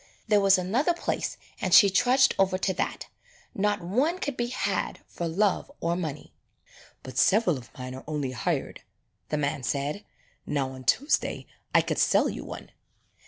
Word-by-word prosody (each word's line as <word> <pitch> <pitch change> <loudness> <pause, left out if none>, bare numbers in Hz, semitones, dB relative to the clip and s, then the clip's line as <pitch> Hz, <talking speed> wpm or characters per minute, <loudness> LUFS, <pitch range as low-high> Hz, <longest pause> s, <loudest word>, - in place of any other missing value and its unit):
There 210 -2 +4
was 195 -1 +5
another 240 - +1
place - - -3 0.2
and 185 -3 +4
she 200 - +9
trudged 250 +6 +4
over 190 -1 +3
to 190 0 0
that. - - -3 0.5
Not 205 -1 0
one 260 - +1
could 285 -7 -3
be 240 -1 -1
had 250 - -2
for 170 - -4
love 195 +9 0
or 170 +1 0
money. 155 -5 -5 0.7
"But 130 0 -4
several 195 -4 +4
of 125 -3 -10
mine 130 0 -6
are 130 - -9
only 145 -4 -2
hired," 120 - -2 0.5
the 150 - 0
man 145 -1 -1
said. 145 - -2 0.4
"Now 135 -2 -2
on 130 -1 -10
Tuesday 285 +3 +1 0.3
I - - +7
could - - -2
sell - - +3
you - - -6
one." - - -9
185 Hz, 165 wpm, -27 LUFS, 145-215 Hz, 0.7 s, she